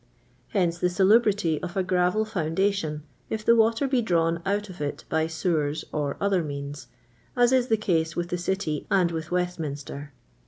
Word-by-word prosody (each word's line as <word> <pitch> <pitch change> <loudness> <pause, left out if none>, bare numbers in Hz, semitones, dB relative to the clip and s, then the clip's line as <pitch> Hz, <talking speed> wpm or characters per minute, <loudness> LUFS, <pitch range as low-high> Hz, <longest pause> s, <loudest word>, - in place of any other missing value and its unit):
" - - -35
Hence 175 -4 0
the 180 - +2
salubrity 195 -3 +3
of 180 +2 -5
a 190 - +2
gravel 180 +3 +1
foundation, 175 -4 -1 0.3
if 215 -1 -3
the 235 - +6
water 230 +4 +3
be 260 -2 +2
drawn 170 -5 +1
out 205 +1 0
of 180 -5 -10
it 145 -1 -3
by 160 0 +1
sewers 160 -3 -1
or 145 -2 -2
other 195 -3 +1
means, 145 0 -6 0.5
as 245 0 +5
is 255 -1 +3
the 225 - +3
case 165 -6 0
with 175 0 -2
the 180 - -1
City 175 -5 -2
and 180 -3 +3
with 160 0 -4
"Westminster. 150 -5 -3
180 Hz, 175 wpm, -26 LUFS, 160-205 Hz, 0.5 s, the